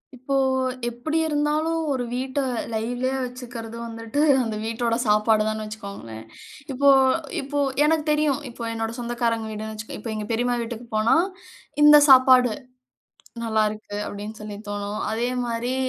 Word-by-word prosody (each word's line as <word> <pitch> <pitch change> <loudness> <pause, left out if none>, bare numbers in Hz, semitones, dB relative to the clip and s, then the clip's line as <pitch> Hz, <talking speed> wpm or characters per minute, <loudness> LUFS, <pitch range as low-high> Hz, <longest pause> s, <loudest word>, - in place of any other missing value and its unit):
இப்போ 260 +2 -3 0.5
எப்டி 245 +7 -2
இருந்தாலும் 305 +2 0
ஒரு 255 -3 -1
வீட்ட 260 +2 -2 0.3
லைவ்லியா 245 +4 -1
வச்சுக்கிறது 245 -2 -7
வந்துட்டு 230 +4 -5 0.2
அந்த 225 -2 -3
வீட்டோட 230 +1 -1
சாப்பாடு 215 +1 +3
தான்னு 215 0 -2
வச்சுக்கோங்களேன். 200 - -8 0.5
இப்போ 280 +2 +3 0.5
இப்போ 285 +1 -3 0.2
எனக்கு 310 0 +2
தெரியும் 300 -2 +1
இப்போ 235 0 -8
என்னோட 225 0 -3
சொந்தக்காரங்க 235 -2 -1
வீடுன்னு 215 +1 -5
வச்சுக்கோ 215 0 -7
இப்போ 225 - -6
எங்க 215 - -4
பெரிம்மா 245 +2 +1
வீட்டுக்கு 235 0 -6
போனா 215 +7 +3 0.7
இந்த 295 0 +9
சாப்பாடு 255 -2 +7 0.9
நல்லாயிருக்கு. 215 -2 -1
அப்டின்னு 210 +2 -7
சொல்லி 210 -1 -7
தோணும் 205 +1 -4
அதேமாரி 245 +1 -1
235 Hz, 130 wpm, -24 LUFS, 220-260 Hz, 0.9 s, இந்த